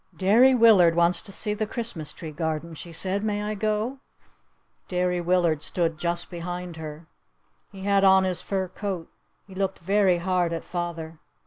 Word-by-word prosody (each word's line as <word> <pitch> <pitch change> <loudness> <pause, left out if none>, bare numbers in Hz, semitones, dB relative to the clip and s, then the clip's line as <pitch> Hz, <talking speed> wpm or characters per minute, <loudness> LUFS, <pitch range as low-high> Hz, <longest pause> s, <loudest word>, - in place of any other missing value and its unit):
"Derry 235 +8 +5
Willard 205 -8 +6
wants 170 0 +3
to 205 - -6
see 210 +2 -1
the 215 +1 -2
Christmas 210 - -3
tree 160 -3 -8
garden," 160 +1 -3
she 170 +2 -8
said. 190 +4 0
"May 210 -1 -1
I 210 +1 -2
go?" 215 +5 -2 0.9
Derry 180 -1 0
Willard 170 -3 +1
stood 165 -1 -1
just 170 +2 -2
behind 175 0 -6
her. 155 0 -8 0.7
He 195 -2 -10
had 200 0 +2
on 190 -1 +6
his 185 -2 +1
fur 190 -2 -2
coat. 185 -2 -5 0.3
He 195 - -14
looked 195 0 -2
very 190 0 +2
hard 175 -1 0
at 165 - -5
father. 165 -2 -5
180 Hz, 165 wpm, -25 LUFS, 170-200 Hz, 0.9 s, Willard